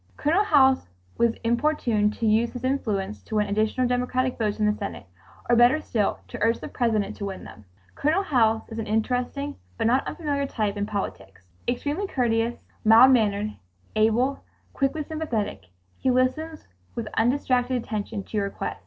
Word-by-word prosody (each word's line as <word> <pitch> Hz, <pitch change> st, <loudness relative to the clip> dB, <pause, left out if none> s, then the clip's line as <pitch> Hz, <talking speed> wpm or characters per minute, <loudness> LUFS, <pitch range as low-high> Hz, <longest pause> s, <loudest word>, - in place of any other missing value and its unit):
Colonel 330 Hz, +8 st, +2 dB
House 270 Hz, -8 st, +4 dB, 0.3 s
was 235 Hz, -1 st, +2 dB
importuned 235 Hz, -4 st, +1 dB
to 230 Hz, -, -3 dB
use 225 Hz, +2 st, +3 dB
his 245 Hz, -1 st, -7 dB
influence 215 Hz, -7 st, -1 dB
to 220 Hz, -, -7 dB
win 210 Hz, -1 st, +3 dB
additional 215 Hz, +5 st, 0 dB
Democratic 250 Hz, +1 st, 0 dB
votes 210 Hz, -3 st, -1 dB
in 215 Hz, -, +2 dB
the 210 Hz, -, +3 dB
Senate, 200 Hz, -, -6 dB, 0.4 s
or 240 Hz, -, +4 dB
better 240 Hz, +6 st, +5 dB
still 215 Hz, -9 st, -1 dB
to -, -, -8 dB
urge 230 Hz, +2 st, +2 dB
the -, -, -7 dB
President 220 Hz, -4 st, 0 dB
to 200 Hz, -, -4 dB
win 195 Hz, -1 st, -6 dB
them. 105 Hz, -, -12 dB, 0.3 s
Colonel 315 Hz, +7 st, +1 dB
House 225 Hz, -, +2 dB
is 225 Hz, 0 st, -6 dB
an 225 Hz, -, -4 dB
interesting 250 Hz, +6 st, -1 dB, 0.2 s
but 225 Hz, -, -1 dB
not 250 Hz, +4 st, +2 dB
unfamiliar 285 Hz, -4 st, -2 dB
type 210 Hz, -5 st, -2 dB
in 205 Hz, 0 st, -2 dB
politics. 95 Hz, -, -5 dB, 0.2 s
Extremely 290 Hz, +10 st, -1 dB
courteous, 235 Hz, -5 st, 0 dB, 0.2 s
mild 225 Hz, +4 st, +8 dB
mannered, 210 Hz, -3 st, +2 dB, 0.4 s
able, 225 Hz, +5 st, +2 dB, 0.3 s
quickly 280 Hz, +3 st, 0 dB
sympathetic, 280 Hz, -, -3 dB, 0.3 s
he 260 Hz, -, +1 dB
listens 260 Hz, +6 st, 0 dB, 0.3 s
with 230 Hz, -2 st, -4 dB
undistracted 250 Hz, +1 st, +1 dB
attention 215 Hz, -3 st, -4 dB
to 215 Hz, -, -5 dB
your 200 Hz, -1 st, +1 dB
request. -, -, -5 dB
235 Hz, 165 wpm, -25 LUFS, 215-265 Hz, 0.4 s, mild